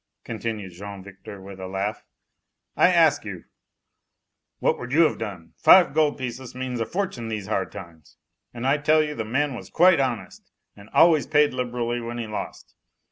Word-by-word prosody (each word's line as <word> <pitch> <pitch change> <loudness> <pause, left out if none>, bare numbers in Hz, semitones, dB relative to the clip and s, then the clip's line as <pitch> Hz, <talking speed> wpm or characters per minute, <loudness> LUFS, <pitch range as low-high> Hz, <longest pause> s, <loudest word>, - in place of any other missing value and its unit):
continued 110 -4 -5
Jean 100 +2 -9
Victor 100 +1 -11
with 95 0 -11
a 95 - -6
laugh, 100 +3 -3 0.7
"I - - +5
ask - - +4
you, - - -7 1.1
what - - 0
would 125 0 -7
you 155 +4 +4
have 160 - +1
done? 95 -7 -7
Five 175 -7 +6
gold 155 -1 +2
pieces 125 -1 -6
means 130 -1 -4
a 115 - -2
fortune 180 - -3
these 110 -3 -4
hard 95 -2 -2
times, 85 -3 -12 0.3
and 120 +1 -6
I 140 +3 +2
tell 155 +1 +3
you 150 -1 -4
the 115 - -4
man 135 +6 -1
was 120 - -9
quite 180 -2 +5
honest 130 -4 -3 0.3
and 100 +1 -15
always 160 -3 +4
paid 150 -2 +3
liberally 120 -1 -2
when 120 +1 -6
he 120 - -3
lost. 105 -1 -7
120 Hz, 180 wpm, -24 LUFS, 100-145 Hz, 1.1 s, Five